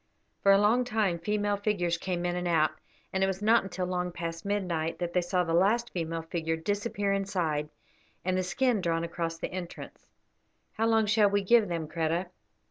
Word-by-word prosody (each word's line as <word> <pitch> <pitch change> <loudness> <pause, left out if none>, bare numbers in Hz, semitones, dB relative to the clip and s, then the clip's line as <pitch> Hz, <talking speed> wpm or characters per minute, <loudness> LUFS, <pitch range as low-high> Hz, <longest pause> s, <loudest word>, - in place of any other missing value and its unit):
For 200 - +5
a 195 - +7
long 215 +5 +3
time 215 -8 0
female 205 +2 0
figures 195 -5 0
came 175 -1 -2
in 175 0 0
and 180 0 -2
out, 160 -3 +3 0.4
and 190 0 +1
it - - +3
was 190 +1 -3
not 225 +2 +5
until 190 -1 -4
long 180 0 -2
past 165 0 -5
midnight 180 -6 -1
that 175 -1 -3
they 180 - +3
saw 180 +1 0
the 165 -1 -2
last 215 +7 +2
female 165 -2 -3
figure 165 -1 -2
disappear 205 +3 -1
inside 175 -7 -1 0.6
and 185 0 +1
the 185 - +1
skin 225 +4 +1
drawn 165 -1 0
across 165 0 -3
the - - -5
entrance. 180 -2 -8 0.6
"How 225 - 0
long 225 -1 +3
shall 210 -1 +4
we 200 0 +1
give 230 +2 +5
them, 165 -3 -3
Kreta?" 165 +3 -1
185 Hz, 195 wpm, -29 LUFS, 170-205 Hz, 0.6 s, a